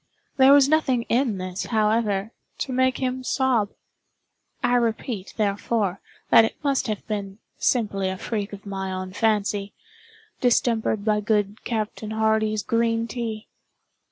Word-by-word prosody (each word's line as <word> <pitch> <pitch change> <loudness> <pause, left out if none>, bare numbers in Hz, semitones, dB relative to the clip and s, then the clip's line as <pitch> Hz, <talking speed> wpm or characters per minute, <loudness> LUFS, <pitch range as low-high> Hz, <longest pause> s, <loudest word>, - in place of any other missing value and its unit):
There 265 0 +7
was 280 -1 +7
nothing 275 -6 +2
in 235 -4 +1
this, 185 0 -4
however, 215 -2 +1 0.3
to 260 - -3
make 260 0 +2
him 255 0 -2
sob. 255 -6 +1 0.9
I 245 0 +2
repeat, 230 -4 -1
therefore, 205 -2 0 0.3
that 225 - +8
it 225 - -1
must 275 -3 +1
have 215 -2 -3
been 200 -2 -4 0.2
simply 200 -6 +1
a 190 - -4
freak 210 0 -3
of 200 0 -10
my 190 -1 -4
own 185 0 -5
fancy, 205 -2 0 0.6
distempered 230 -4 +1
by 210 -1 +2
good 210 -1 0
Captain 215 -1 -3
Hardy's 220 -1 +1
green 230 0 +1
tea. 225 -2 -5
220 Hz, 135 wpm, -24 LUFS, 205-240 Hz, 0.9 s, that